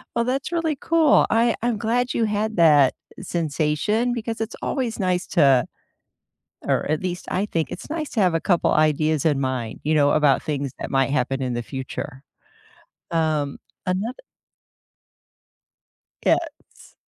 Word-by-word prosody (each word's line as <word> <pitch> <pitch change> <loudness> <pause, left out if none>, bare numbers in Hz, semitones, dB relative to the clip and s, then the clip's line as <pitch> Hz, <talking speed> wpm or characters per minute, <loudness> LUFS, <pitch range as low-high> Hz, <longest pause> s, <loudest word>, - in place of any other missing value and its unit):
Well, 235 - +2
that's 270 +5 -2
really 320 -3 0
cool. 320 -1 +4
I 230 +1 +3
I'm 235 -1 0
glad 240 +4 0
you 230 - +1
had 215 +1 -1
that 150 -5 +6 0.3
sensation 170 +8 0
because 230 -1 -4
it's 225 - -4
always 240 -5 -2
nice 180 -1 0
to 135 -7 +4 1.0
or - - 0
at 155 - 0
least, 180 -1 -4
I 195 - 0
think, 165 -5 -2
it's 190 - -8
nice 310 -1 -3
to 225 - -1
have 180 -4 +3
a 165 - +1
couple 175 -1 +2
ideas 155 0 +2
in 145 -3 +2
mind, 130 -4 -3
you 155 +2 +1
know, 145 -1 +4
about 150 -3 +3
things 140 -3 -3
that - - -5
might 135 0 +2
happen 135 -1 0
in 125 - -1
the 120 0 -2
future. 130 +1 -6 0.9
Um, 155 -4 0 0.3
anothe 195 +7 -1 2.1
Yeah, - - +5 0.3
it's - - -19
170 Hz, 155 wpm, -23 LUFS, 145-225 Hz, 2.1 s, that